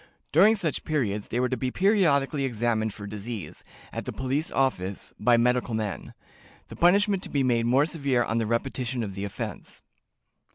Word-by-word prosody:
During 200 +8 +6
such 170 -8 -2
period 120 -10 -1
they 120 - -1
were 125 - +2
to 130 - -1
be 130 +1 -2
periodically 150 - +2
examined 115 -3 0
for 105 0 -9
disease, 105 -4 -7 0.3
at - - -4
the - - -4
police 135 +4 -2
office, 100 -8 -1
by 120 +2 +4
medical 125 -1 +1
men; 105 -3 -4 0.5
the - - -9
punishment 195 +2 +3
to - - -7
be 140 -2 +1
made 120 -2 +2
more 135 +4 +4
severe 140 -6 0
on 115 0 -1
the 115 - -1
repetition 120 +1 -2
of 100 -3 -5
the 100 +1 -4
offense." 100 - -7
125 Hz, 175 wpm, -26 LUFS, 110-145 Hz, 0.5 s, During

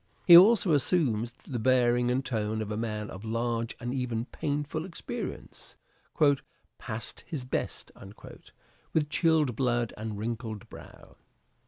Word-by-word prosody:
He 175 - +10
also 195 -1 +7
assumes 130 - +1
the 125 0 -7
bearing 125 0 +3
and 130 +2 0
tone 110 -3 -2
of 105 - -7
a - - -2
man 105 -1 -3
of 95 +3 -9
large 115 +1 -2
and 120 0 -4
even 120 -3 -2
painful 145 +3 -3
experience, 175 -1 -7 0.5
" 140 -1 -3
past 110 +1 -6
his 150 -7 -5
best," 125 - -4 1.0
with 150 -2 +1
chilled 155 -6 +2
blood 120 -2 0
and 110 -1 -5
wrinkled 110 -1 -5
brow. - - -14
120 Hz, 135 wpm, -28 LUFS, 110-145 Hz, 1.0 s, He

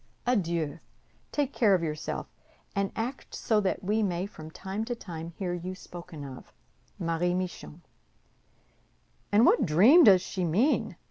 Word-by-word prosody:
Adieu! 170 - 0 0.5
Take 285 -2 -1
care 210 -5 +4
of 175 - -1
yourself, 155 -1 -3 0.5
and 200 -1 0
act 245 +4 -5
so 220 -3 +1
that 195 -1 -1
we 210 +4 +1
may 180 -3 -1
from 155 -6 -10
time 195 +6 -5
to 240 +1 -3
time 170 -7 -7
hear 180 -3 -2
you 180 +2 -5
spoken 170 -5 -10
of. 130 -2 -10 0.5
"MARIE 175 +1 0
MICHON" 180 -2 -5 1.5
"And 210 +4 +5
what 255 - +5
dream 220 - +7
does 190 -7 +7
she 185 -1 -3
mean?" 200 - +1
185 Hz, 145 wpm, -28 LUFS, 170-215 Hz, 1.5 s, dream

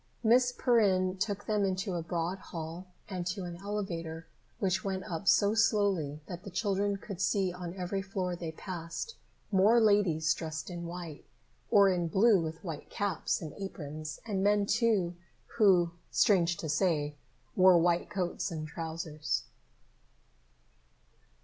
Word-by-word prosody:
Miss 245 +2 +5
Perrin 195 -7 +2
took 205 0 -2
them 210 -1 +1
into 190 0 -1
a 170 - -1
broad 170 +2 -2
hall 165 +2 -7 0.2
and 185 -3 -4
to 185 +1 -3
an 175 -1 -6
elevator 170 -5 -4 0.3
which 190 -2 0
went 190 -1 -2
up 175 +3 -5
so 205 0 +5
slowly 200 -9 +1
that 175 -1 -8
the 200 - -7
children 200 0 0
could 195 -1 -7
see 195 -2 +1
on 180 0 -6
every 190 +1 -2
floor 190 -2 -3
they 170 -2 -5
passed, 170 - -6 0.4
more 205 +4 +5
ladies 200 -8 +3
dressed 160 +1 -5
in 170 -1 -5
white, 170 -3 -7 0.5
or 200 -1 +6
in 180 -3 +1
blue 195 +3 +4
with 160 +2 -5
white 165 -5 -6
caps 205 -2 -1
and 155 - -6
aprons, 155 -5 -6
and 195 -4 -1
men, 205 0 +3
too, 205 -5 +2 0.4
who, 180 -5 +5 0.2
strange 175 -4 +3
to 160 - -5
say, 150 -2 +1 0.4
wore 185 -1 +7
white 170 0 +2
coats 185 +1 -2
and 155 -3 -5
trousers. 160 -2 -3
185 Hz, 145 wpm, -31 LUFS, 165-200 Hz, 0.5 s, wore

